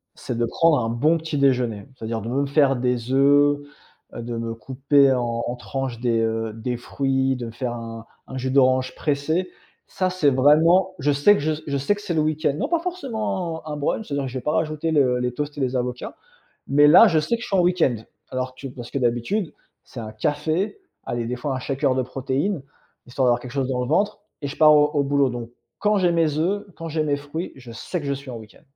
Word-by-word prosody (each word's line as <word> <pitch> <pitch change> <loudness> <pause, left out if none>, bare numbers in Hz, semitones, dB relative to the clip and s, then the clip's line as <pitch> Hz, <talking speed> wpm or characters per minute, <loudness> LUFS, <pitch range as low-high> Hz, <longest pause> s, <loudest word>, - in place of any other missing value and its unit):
c'est 120 - -5
de 120 - +1
prendre 165 +4 +3
un 115 - -1
bon 150 +8 +2
petit-déjeuner. 130 -8 0
C'est-à-dire 115 -2 -4
de 115 - -5
me 140 +3 0
faire 140 -1 +3
des 125 -1 -1
œufs, 145 +1 +4 0.6
heu, 120 - -5
de 120 0 -5
me 115 0 -4
couper 135 +4 +3
en 120 -2 -1
en 120 - -3
tranche 130 -1 -4
des, 115 -2 +1
heu, 115 -1 -1
des 120 +2 -3
fruits, 135 +1 0
de 120 -1 -5
me - - -7
faire 120 +1 -4
un 115 -1 -7 0.2
un 130 - -7
jus 130 +1 -2
d'orange 130 -1 +3
pressé. 155 +5 -1 0.4
Ça, 185 -1 0
c'est 180 -5 +2
vraiment 165 +8 +4
je 145 +2 +2
sais 145 +9 +5
que - - -2
je 155 +1 0
je 140 -1 -1
sais 140 +10 +1
que 205 - -10
c'est 175 - -3
le 155 - +2
week-end 155 -1 0
non - - -1
pas 340 - +2
forcément 220 - -3
un - - -5
un - - -4
brunch. 150 +9 -1
C'est-à-dire 140 -2 -2
que 130 - -5
je 130 - -4
vais - - -10
pas 150 - 0
rajouter 160 0 -1
le 130 -5 +3
les 125 0 -1
toasts 145 +3 -4
et - - -3
les 130 0 0
avocats, 125 0 -4 0.5
mais 145 +2 +5
là, - - +9
je 160 - +2
sais 155 +10 -1
que 230 - -11
je - - -5
suis 195 - +1
en 180 - +4
week-end. 175 -9 +2 0.3
Alors 130 0 -3
que 135 - -7
parce 120 -2 -9
que 140 - -1
d'habitude, 125 - -1 0.3
c'est 125 - -12
un 110 -1 -7
café. 155 - -1 0.3
Allez, 120 -1 -3
des 120 - -2
fois, 135 +2 -3
un - - -4
shaker 135 0 0
de 130 - +2
protéines, 135 +7 -2 0.4
histoire 130 +1 0
d'avoir 120 0 +3
quelque 125 0 -9
chose 135 -2 -1
dans 125 -1 -1
le 125 - -4
ventre 200 +8 +1 0.2
et - - -2
je 140 - -7
pars 155 -1 +7
au 150 0 +5
au 145 - +2
boulot 140 -1 +2
donc 120 -1 -6 0.3
quand 210 0 +2
j'ai 180 -2 +3
mes 160 -3 +1
œufs, 200 +5 0
quand 165 0 -6
j'ai 155 0 -1
mes 145 -1 +1
fruits, 145 +5 -5
je 125 -3 -11
sais 145 +10 -4
que 145 - -7
je 140 - 0
suis 135 -1 -9
en 120 - -6
week-end. 110 -2 -13
140 Hz, 240 wpm, -23 LUFS, 125-155 Hz, 0.6 s, là